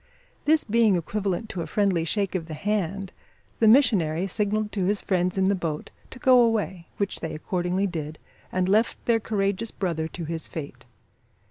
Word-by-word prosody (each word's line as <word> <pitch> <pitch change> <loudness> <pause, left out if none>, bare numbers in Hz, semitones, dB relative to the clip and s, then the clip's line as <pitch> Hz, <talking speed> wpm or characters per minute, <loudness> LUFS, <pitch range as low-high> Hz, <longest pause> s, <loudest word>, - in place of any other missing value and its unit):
This 310 +1 +4
being 225 -2 +3
equivalent 195 +3 -2
to 180 - -4
a - - -4
friendly 195 -5 +1
shake 200 +3 -1
of 170 -4 -3
the 155 - -6
hand, 195 +1 -2 0.5
the 225 - +5
missionary 200 - +4
signalled 210 +1 -1
to 195 -4 -1
his 205 +2 +1
friends 180 -1 0
in 190 0 +3
the 200 - +3
boat 165 -5 -3 0.2
to - - -10
go 255 -1 +6
away, 210 -7 0
which 200 -1 -2
they 160 -1 -4
accordingly 180 +4 -1
did, 155 -4 -4 0.3
and 185 0 0
left 215 +4 +2
their 230 -1 +3
courageous 205 0 -1
brother 170 -6 -2
to 170 0 -7
his 160 0 -4
fate. 150 -4 -8
195 Hz, 175 wpm, -25 LUFS, 170-210 Hz, 0.5 s, go